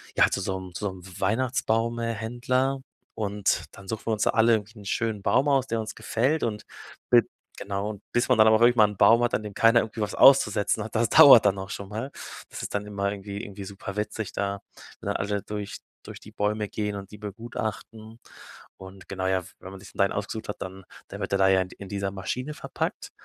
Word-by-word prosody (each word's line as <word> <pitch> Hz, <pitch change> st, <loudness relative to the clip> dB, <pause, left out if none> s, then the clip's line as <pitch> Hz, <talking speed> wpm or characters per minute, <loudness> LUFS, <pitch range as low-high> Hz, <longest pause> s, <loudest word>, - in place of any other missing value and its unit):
ja, -, -, +5 dB
zu -, -, -1 dB
so 95 Hz, 0 st, -2 dB
'nem 90 Hz, -1 st, -10 dB
zu 105 Hz, -, -5 dB
so 100 Hz, -, -1 dB
'nem 90 Hz, -1 st, -13 dB, 0.2 s
Weihnachtsbaum 115 Hz, +1 st, 0 dB
äh, 115 Hz, 0 st, -1 dB
Händler 125 Hz, +5 st, -1 dB, 0.3 s
und 105 Hz, -2 st, -1 dB
dann 100 Hz, -1 st, -13 dB
suchen 110 Hz, +1 st, -5 dB
wir -, -, +1 dB
uns 105 Hz, -, 0 dB
da -, -, +3 dB
alle 115 Hz, 0 st, +4 dB
irgendwie 110 Hz, +1 st, -2 dB
'n 100 Hz, -, -13 dB
schönen 110 Hz, 0 st, -1 dB
Baum 130 Hz, +8 st, +3 dB
aus, 135 Hz, -2 st, +2 dB
der 115 Hz, 0 st, -1 dB
uns 110 Hz, -, -6 dB
gefällt 135 Hz, +8 st, 0 dB
und 110 Hz, -2 st, -2 dB, 0.5 s
b -, -, +8 dB, 0.4 s
genau, 100 Hz, +1 st, -4 dB
bis 120 Hz, +2 st, +1 dB
man 125 Hz, -, +4 dB
dann 110 Hz, 0 st, +7 dB
aber 110 Hz, 0 st, +6 dB
auch -, -, -5 dB
irgendwann 120 Hz, -3 st, +5 dB
'n 100 Hz, -, -11 dB
Baum 115 Hz, +4 st, +6 dB
hat, 120 Hz, -, 0 dB
an 110 Hz, -, -2 dB
dem 105 Hz, -1 st, -7 dB
keiner 115 Hz, +2 st, +5 dB
irgendwie 110 Hz, 0 st, -6 dB
was 105 Hz, -, -2 dB
auszusetzen 105 Hz, -5 st, +5 dB
hat, 110 Hz, -, -9 dB
das 115 Hz, 0 st, +2 dB
dauert 125 Hz, -7 st, +9 dB
dann 100 Hz, -1 st, +3 dB
auch 95 Hz, +1 st, -6 dB
schon 100 Hz, 0 st, -6 dB
mal. 115 Hz, +6 st, -5 dB, 0.4 s
Das -, -, -7 dB
ist -, -, -5 dB
dann 100 Hz, 0 st, -2 dB
immer 100 Hz, -1 st, -2 dB
irgendwie 100 Hz, +1 st, -6 dB
irgendwie 100 Hz, -1 st, -8 dB
super 100 Hz, 0 st, -8 dB
witzig 105 Hz, -1 st, -3 dB
da. 100 Hz, 0 st, -2 dB, 0.4 s
Wenn -, -, -7 dB
dann -, -, 0 dB
alle 100 Hz, 0 st, -2 dB
durch 105 Hz, -1 st, -6 dB, 0.2 s
durch -, -, -10 dB
die -, -, -13 dB
Bäume 105 Hz, 0 st, -1 dB
gehen 105 Hz, -1 st, -3 dB
und 100 Hz, 0 st, -8 dB
die 105 Hz, -, -10 dB
begutachten 110 Hz, +1 st, -6 dB, 0.6 s
und 95 Hz, 0 st, -12 dB
genau, 95 Hz, -1 st, -2 dB
ja, 95 Hz, -1 st, +1 dB
w -, -, -13 dB
wenn 95 Hz, -, -10 dB
man 95 Hz, -, -10 dB
sich 100 Hz, -, -13 dB
dann -, -, -19 dB
sein -, -, -5 dB
ausgesucht 105 Hz, +2 st, -4 dB
hat, -, -, -5 dB
dann 95 Hz, 0 st, -7 dB, 0.3 s
dann -, -, -8 dB
wird -, -, -3 dB
er 100 Hz, -, +2 dB
da 95 Hz, -, +5 dB
ja 95 Hz, 0 st, +4 dB
in 90 Hz, -, -4 dB
d -, -, -14 dB
in 100 Hz, -2 st, -9 dB
dieser 100 Hz, -1 st, -2 dB
Maschine 125 Hz, +9 st, -4 dB
verpackt, -, -, -4 dB
105 Hz, 240 wpm, -26 LUFS, 100-115 Hz, 0.6 s, dauert